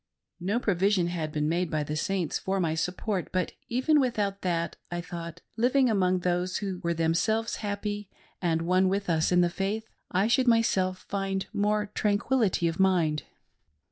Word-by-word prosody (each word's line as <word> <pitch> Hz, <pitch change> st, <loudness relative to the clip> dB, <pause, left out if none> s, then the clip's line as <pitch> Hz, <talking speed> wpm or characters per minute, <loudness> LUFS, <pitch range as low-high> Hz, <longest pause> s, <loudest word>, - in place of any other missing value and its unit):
No 195 Hz, +7 st, 0 dB
provision 190 Hz, -4 st, +2 dB
had 160 Hz, -3 st, -3 dB
been 150 Hz, 0 st, 0 dB
made 170 Hz, +2 st, 0 dB
by 155 Hz, -1 st, 0 dB
the 150 Hz, +1 st, -4 dB
Saints 180 Hz, +2 st, -1 dB
for 195 Hz, 0 st, -1 dB
my 165 Hz, -3 st, +1 dB
support; 180 Hz, +3 st, -2 dB
but 185 Hz, -2 st, 0 dB, 0.2 s
even 260 Hz, +6 st, +3 dB
without 210 Hz, -7 st, 0 dB
that, 170 Hz, -2 st, -1 dB
I 175 Hz, -, -3 dB
thought, 170 Hz, 0 st, -7 dB, 0.2 s
living 250 Hz, +2 st, +3 dB
among 185 Hz, -3 st, +2 dB
those 180 Hz, +1 st, 0 dB
who 195 Hz, -3 st, -3 dB
were 170 Hz, -1 st, -1 dB
themselves 180 Hz, +8 st, +1 dB
happy, 205 Hz, -1 st, -4 dB, 0.3 s
and 165 Hz, -2 st, +1 dB
one 185 Hz, +2 st, +3 dB
with 195 Hz, -1 st, 0 dB
us 160 Hz, +1 st, +2 dB
in 180 Hz, 0 st, +5 dB
the 175 Hz, -, +3 dB
faith, 205 Hz, +4 st, -2 dB, 0.2 s
I 190 Hz, +3 st, +2 dB
should 250 Hz, +3 st, +3 dB
myself 190 Hz, -5 st, +2 dB
find 195 Hz, -1 st, -2 dB
more 210 Hz, 0 st, 0 dB
tranquillity 205 Hz, -3 st, +1 dB
of 165 Hz, +2 st, -3 dB
mind. 170 Hz, -6 st, +3 dB
185 Hz, 170 wpm, -28 LUFS, 170-205 Hz, 0.3 s, in